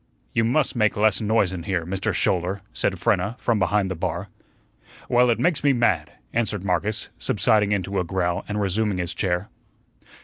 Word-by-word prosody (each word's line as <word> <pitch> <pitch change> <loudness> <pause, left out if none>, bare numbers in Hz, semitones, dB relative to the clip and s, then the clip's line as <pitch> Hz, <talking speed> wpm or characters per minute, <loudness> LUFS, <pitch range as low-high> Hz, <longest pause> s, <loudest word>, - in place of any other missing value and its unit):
"You 115 - +2
must 130 +6 +1
make 110 -3 +2
less 105 -2 +3
noise 105 -3 +2
in 90 - -4
here, 85 -2 -2
Mister 95 +2 -1
Schouler," 95 +2 0
said - - 0
Frenna, 110 +4 +1
from 115 -4 0
behind 95 +1 +1
the - - -2
bar. 90 +3 -3 0.8
"Well, 125 0 +4
it 115 - +3
makes 165 -5 +1
me 140 -1 +4
mad," 100 -11 +1 0.2
answered 110 -4 -1
Marcus, 100 +5 -1
subsiding 105 +1 +2
into 100 -1 -1
a - - +1
growl 90 0 -1
and 105 0 -2
resuming 100 0 0
his 90 0 -2
chair. 90 +1 -1
100 Hz, 175 wpm, -24 LUFS, 90-110 Hz, 0.8 s, Well